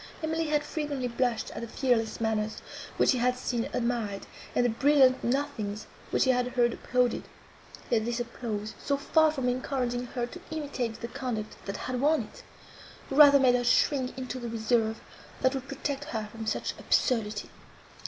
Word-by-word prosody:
Emily 320 0 0
had 300 -1 +1
frequently 295 -4 -3
blushed 240 -1 -1
at - - -6
the 235 - -5
fearless 235 -2 0
manners, 220 -1 -1 0.3
which - - +5
she 255 - +1
had 250 +1 +2
seen 240 -2 -2
admired, 230 -5 -1 0.3
and 245 - +3
the - - +3
brilliant 265 +1 +4
nothings, 235 -6 -2 0.2
which - - +2
she 260 - +4
had 250 -1 +1
heard 240 -2 +3
applauded; 250 -2 +1 0.7
yet 225 -2 +3
this 240 +1 -1
applause, 225 -3 -4
so 280 -1 +1
far 315 +3 +4
from 270 -5 -2
encouraging 250 -1 -1
her 240 0 -2
to 340 +9 -10
imitate 275 -7 -3
the 235 - -3
conduct 240 -5 -4
that 195 - -3
had 255 -1 -3
won 305 +2 +3
it, - - -13 0.7
rather 285 0 +8
made 255 -2 +5
her 245 0 +2
shrink 255 +1 +2
into 255 0 -4
the 240 -1 -5
reserve, 225 0 +1 0.4
that 260 +1 +4
would 270 0 -4
protect 280 +1 -3
her 220 -7 -4
from 225 0 -7
such - - -1
absurdity. 215 -5 0
250 Hz, 175 wpm, -29 LUFS, 230-275 Hz, 0.7 s, rather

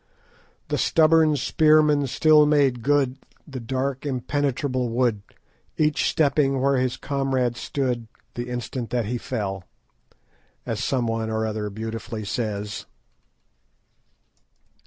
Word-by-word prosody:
"The - - -1
stubborn 160 -1 +4
spearmen 150 0 +3
still 150 +3 +5
made 140 -5 +2
good 135 0 +1 0.3
The 135 -3 -6
dark 130 +3 -3
impenetrable 130 -1 -1
wood, 115 -3 +1 0.6
Each 155 -1 +2
stepping 140 -3 +2
where 135 +1 +2
his 130 -1 0
comrade 135 -3 -1
stood 125 -3 -2 0.3
The 120 +1 -5
instant 120 -1 -4
that 120 -1 -1
he 120 +3 -3
fell," 100 -7 -4 1.0
as - - -3
someone 115 -3 -1
or 110 0 -1
other 105 -1 -3
beautifully 110 +1 -6
says. 105 -1 -4
130 Hz, 110 wpm, -24 LUFS, 115-145 Hz, 1.0 s, still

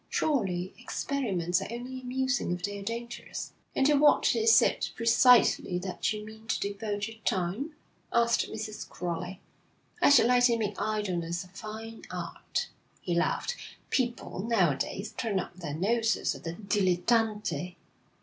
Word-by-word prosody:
'Surely 190 - 0
experiments 195 -9 -1
are - - -4
only 250 +2 -6
amusing 255 -4 -1
if 180 0 -3
they're 205 +1 -3
dangerous.' 235 +3 -5 0.2
'And 265 - +3
to 295 - +5
what 295 +1 +5
is 450 0 +6
it - - +1
precisely 230 -5 +5
that 180 +3 -2
you 210 -1 -4
mean 220 +1 -12
to 250 - 0
devote 205 0 -2
your 225 0 -10
time?' 220 - -1 0.4
asked 235 0 +2
Mrs. 215 -1 -6
Crowley. 180 +2 -4 0.6
'I - - +6
should 280 -5 +7
like 245 0 +5
to 235 -2 +4
make 210 -2 -2
idleness 180 -6 -1
a 180 - -16
fine 220 +4 -8
art,' - - -4 0.3
he 175 - -2
laughed. 180 - 0 0.4
'People, 245 -6 -1
now 195 -6 +3
a - - -1
days, 200 +9 -4
turn 215 -6 -1
up 180 - -6
their 155 -5 -5
noses 225 +6 +1
at - - -11
the 165 - -3
dilettante. 195 -2 0
215 Hz, 150 wpm, -29 LUFS, 180-235 Hz, 0.6 s, should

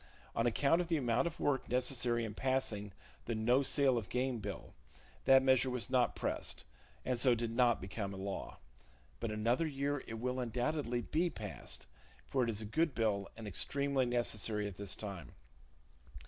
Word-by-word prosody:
On 115 +1 +2
account 140 +8 +3
of 175 - -3
the 165 -1 +2
amount 120 +2 +2
of 170 - -6
work 140 -2 0
necessary 125 -2 +1
in 110 - -5
passing 110 -5 -1 0.3
the 115 - -1
no 120 +5 +3
sale 135 -3 +3
of 100 - -9
game 125 -1 0
bill, 100 -3 -6 0.5
that 135 0 +7
measure 130 -1 +4
was 125 0 -3
not 125 -2 +3
pressed, - - -2 0.4
and 125 -2 0
so 125 0 +6
it - - 0
did 115 0 -2
not 120 0 +3
become 100 +1 -4
a 95 - -6
law; 95 0 -5 0.6
but 115 - -2
another 115 +9 +1
year 140 -1 -1
it 115 - -5
will 125 +3 -2
undoubtedly 125 +1 -1
be 165 - +1
passed, 105 - -7 0.4
for 130 -2 +1
it 120 - 0
is 110 -1 0
a - - -5
good 155 +7 +1
bill, 105 -3 0
and 110 -2 -7
extremely 140 +6 0
necessary 110 -3 0
at 100 - -7
this 100 -2 -1
time. 95 - -7
120 Hz, 180 wpm, -35 LUFS, 110-135 Hz, 0.6 s, that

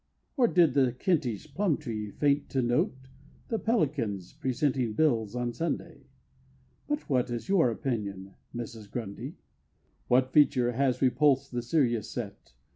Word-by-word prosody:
Or 255 -5 +4
did 170 - +4
the 130 -3 +3
Kentish 130 - -1
Plumtree 140 - -1
faint 145 +6 +1
to 130 -2 0
note 120 +2 +1 0.5
The 225 - 0
Pelicans 135 - -1
presenting 130 -3 0
bills 115 -6 +1
on 120 -1 -2
Sunday? 165 -2 -4 0.8
But 295 +1 -2
what 130 -3 +1
is 120 -2 -4
your 185 -10 +4
opinion, 100 -6 -3 0.2
Mrs. 115 -3 -7
Grundy? 100 -3 -6 0.7
What 130 +1 +3
feature 125 -5 +4
has 130 +1 +1
repulsed 135 +1 +3
the 120 -1 -2
serious 120 -4 +1
set? 100 - -7
125 Hz, 130 wpm, -29 LUFS, 115-150 Hz, 0.8 s, Or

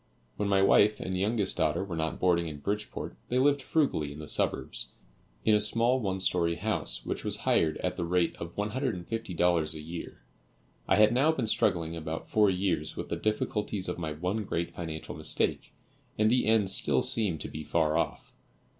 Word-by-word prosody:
When 105 -1 -1
my 95 -1 +4
wife 105 +2 +5
and 95 - -3
youngest 105 +2 0
daughter 80 +3 +1
were 95 -4 -5
not 80 0 -2
boarding 85 -2 +2
in 75 -2 -6
Bridgeport, 105 -7 -4
they 125 - +1
lived 140 +2 +3
frugally 130 - 0
in 70 - -9
the 75 -1 -8
suburbs, - - 0 0.6
in 110 - +5
a 105 - +5
small 120 +4 +1
one 95 -5 -2
story 85 -2 +1
house 105 +5 -2
which - - -3
was - - -1
hired 80 -2 +2
at - - -1
the - - -1
rate 85 0 +1
of 85 +1 -7
$150 95 - 0
a - - -6
year. 80 +2 -8 0.6
I 95 - +4
had 105 +2 +5
now 140 +6 +4
been 130 -7 -2
struggling 85 -6 +1
about 80 0 -5
four 105 -2 +4
years 90 -5 -1
with - - -5
the - - -1
difficulties 105 -2 -1
of 90 - -3
my 80 -2 -3
one 90 +8 -2
great 85 -3 -2
financial 80 -2 -6
mistake, 80 0 0 0.5
and 110 +1 +3
the 125 -2 +2
end 110 -4 +3
still 70 -8 +2
seemed 100 -9 +1
to - - -4
be 75 - -7
far 80 -1 +1
off. 85 - -2
95 Hz, 190 wpm, -29 LUFS, 80-110 Hz, 0.6 s, wife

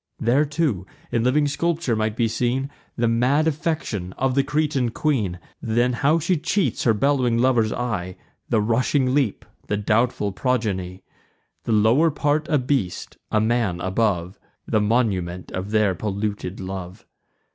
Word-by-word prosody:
There 130 +6 +3
too, 145 - -1 0.2
in 115 - +1
living 145 +4 +3
sculpture, 160 -3 0
might 110 0 -1
be 115 -1 +2
seen 125 +4 -1 0.2
The 120 -1 +1
mad 125 +7 +2
affection 145 - -2
of 130 0 0
the 140 +1 +3
Cretan 145 -4 0
queen; 115 - -1 0.2
Then 120 +2 +1
how 140 +6 +2
she 170 +2 +1
cheats 185 +5 0
her 115 - +5
bellowing 130 -1 +2
lover's 120 -3 +3
eye; 105 -7 -3 0.3
The 110 - +2
rushing 125 +4 +1
leap, 135 -7 0 0.2
the 105 - 0
doubtful 105 0 +1
progeny, 100 -6 -2 0.6
The - - -1
lower 115 +10 +4
part 150 +1 0
a 150 - +3
beast, 125 -8 -2
a 110 - +3
man 110 -5 +1
above, 95 -1 -1 0.3
The 110 - +1
monument 100 -6 0
of 95 +2 -4
their 105 -2 +2
polluted 100 0 -3
love. 95 -1 -7
115 Hz, 145 wpm, -23 LUFS, 105-140 Hz, 0.6 s, her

